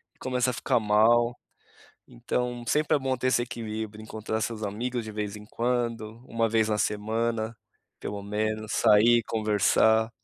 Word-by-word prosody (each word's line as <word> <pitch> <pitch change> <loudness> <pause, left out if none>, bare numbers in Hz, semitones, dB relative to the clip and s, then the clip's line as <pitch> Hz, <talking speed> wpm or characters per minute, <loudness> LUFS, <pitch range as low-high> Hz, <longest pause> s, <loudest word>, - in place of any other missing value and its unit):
e - - -35
começa 125 -1 0
a - - -7
ficar 115 - +1
mal. 115 +3 +3 0.7
Então 120 - -3
sempre 155 +1 +2
é - - +1
bom 130 -1 -1
ter 130 - -1
esse 130 - +3
equilíbrio, 110 -2 -5
encontrar 110 0 -4
seus 110 -2 -3
amigos 120 +4 -3
de 110 - -7
vez 105 -1 -4
em 105 0 -11
quando, 115 -2 -2
1 115 0 0
vez 110 -1 +2
na 105 - +1
semana, 110 +2 -1 0.4
pelo 100 -1 -5
menos, 110 +1 -2
sair, 115 +3 +5
conversar. 110 +1 +3
110 Hz, 160 wpm, -27 LUFS, 105-120 Hz, 0.7 s, sair